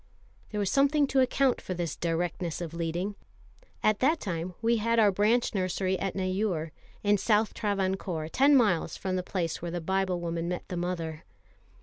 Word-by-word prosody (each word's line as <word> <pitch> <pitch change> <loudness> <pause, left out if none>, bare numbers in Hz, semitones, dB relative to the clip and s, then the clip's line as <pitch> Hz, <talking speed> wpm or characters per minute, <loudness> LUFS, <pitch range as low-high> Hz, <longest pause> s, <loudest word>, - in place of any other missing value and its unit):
There 210 - -5
was 200 -2 0
something 285 +1 +4
to 270 -1 +1
account 260 0 +2
for 185 - -4
this 170 -3 -3
directness 170 0 -2
of 170 -2 -5
leading. 170 +4 -2 0.7
At 215 -1 +3
that 305 +5 +3
time 175 -2 -4
we 230 +1 +2
had 230 +2 +1
our 210 -3 +6
branch 215 +6 +2
nursery 185 -1 0
at 195 - -2
Neyoor, 185 -4 -1 0.3
in 205 -1 +3
South 215 +1 +2
Travancore, 190 -5 -1
ten 275 - +4
miles 200 - +2
from 185 -1 -2
the 185 - 0
place 175 -3 -3
where 170 - -3
the 175 +1 -3
Biblewoman 175 -2 -1
met 180 0 -4
the 180 - -3
mother. 170 -3 -3
185 Hz, 175 wpm, -28 LUFS, 170-215 Hz, 0.7 s, our